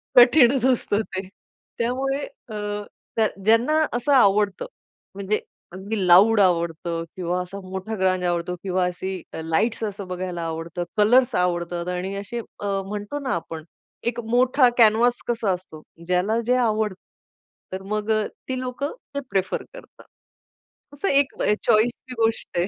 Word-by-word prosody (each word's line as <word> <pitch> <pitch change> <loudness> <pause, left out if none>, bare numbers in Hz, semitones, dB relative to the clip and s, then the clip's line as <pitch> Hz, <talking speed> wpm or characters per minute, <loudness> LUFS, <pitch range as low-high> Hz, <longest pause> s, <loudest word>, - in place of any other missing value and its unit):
कठीणच 250 0 +6
असतं 240 -5 +2
ते. 190 -3 -6 0.5
त्यामुळे 270 +4 -1 0.2
अ, 215 - -6 0.9
ज्यांना 250 +9 +4
असं 245 +4 0
आवडतं 205 - +3 0.5
म्हणजे 200 +2 -1 0.3
अगदी 195 +2 -3
लाउड 205 +5 +7
आवडतं 170 -2 +1
किंवा 180 0 -1
असा 185 +2 -7
मोठा 190 +4 -4
ग्रांज 185 -1 +1
आवडतो 175 0 -1
किंवा 185 -1 +1
अशी 185 +1 -4 0.2
लाईट्स 190 +9 0
असं 200 -2 -4
बघायला 180 -1 -4
आवडतं, 165 +2 -4
कलर्स 245 +4 +4
आवडतात 175 -1 -1
आणि 180 +2 -3
असे 205 +4 -5 0.2
म्हणतो 205 +5 -3
ना, 270 -2 -2
आपण 165 -1 -6 0.5
एक 240 - -8
मोठा 255 +1 +4
कॅनव्हास 235 +1 +4
कसा 230 -4 +1
असतो 180 -4 -9 0.3
ज्याला 185 +5 +1
जे 250 - +4
आवडतं. 215 -5 0 0.7
तर 190 - -4
मग 215 +1 -1 0.4
ती 255 -1 -2
लोकं 255 +3 -4 0.2
ते - - 0
प्रिफर 190 -3 -1
करतात. - - -14 0.9
असं 290 +8 -3
एक 280 0 +3 0.3
चॉईसची 240 +4 +1
गोष्ट 225 -5 -1
आहे, 175 - +2
205 Hz, 130 wpm, -23 LUFS, 180-240 Hz, 0.9 s, लाउड